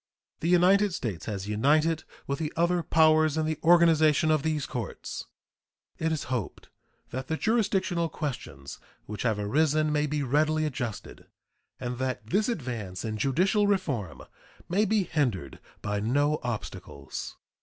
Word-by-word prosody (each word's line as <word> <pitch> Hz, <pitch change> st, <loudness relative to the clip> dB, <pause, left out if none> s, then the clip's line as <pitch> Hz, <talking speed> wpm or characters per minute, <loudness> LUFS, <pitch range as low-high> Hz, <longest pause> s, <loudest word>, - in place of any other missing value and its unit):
The 165 Hz, -, -1 dB
United 185 Hz, +2 st, +4 dB
States 105 Hz, -, -4 dB
has 100 Hz, -2 st, -4 dB
united 150 Hz, +9 st, +2 dB, 0.2 s
with 140 Hz, 0 st, -3 dB
the 155 Hz, -1 st, -2 dB
other 175 Hz, +1 st, +2 dB
powers 155 Hz, -1 st, +4 dB
in 155 Hz, -, +1 dB
the 155 Hz, -1 st, -2 dB
organization 160 Hz, -2 st, +5 dB
of 155 Hz, -2 st, +3 dB
these 155 Hz, -2 st, -1 dB
courts. 120 Hz, -6 st, -5 dB, 0.7 s
It 160 Hz, 0 st, 0 dB
is 155 Hz, -3 st, -1 dB
hoped 115 Hz, -8 st, -4 dB, 0.4 s
that 130 Hz, +2 st, -4 dB
the 160 Hz, -, -1 dB
jurisdictional 190 Hz, -6 st, +1 dB
questions 80 Hz, -, -6 dB, 0.3 s
which 105 Hz, -1 st, -6 dB
have 110 Hz, -4 st, +1 dB
arisen 150 Hz, +8 st, +2 dB
may 150 Hz, 0 st, +1 dB
be 150 Hz, 0 st, -1 dB
readily 155 Hz, +4 st, +2 dB
adjusted, 120 Hz, -7 st, -5 dB, 0.5 s
and 125 Hz, -1 st, -4 dB
that 130 Hz, -3 st, -2 dB
this 210 Hz, -, +1 dB
advance 120 Hz, -, -4 dB
in 110 Hz, -1 st, -3 dB
judicial 185 Hz, -, +2 dB
reform 140 Hz, -, -1 dB, 0.4 s
may 200 Hz, +5 st, +2 dB
be 210 Hz, 0 st, +2 dB
hindered 125 Hz, -, -2 dB, 0.2 s
by 105 Hz, -1 st, -1 dB
no 145 Hz, +8 st, +1 dB
obstacles. 105 Hz, -, -6 dB
150 Hz, 145 wpm, -28 LUFS, 120-165 Hz, 0.7 s, organization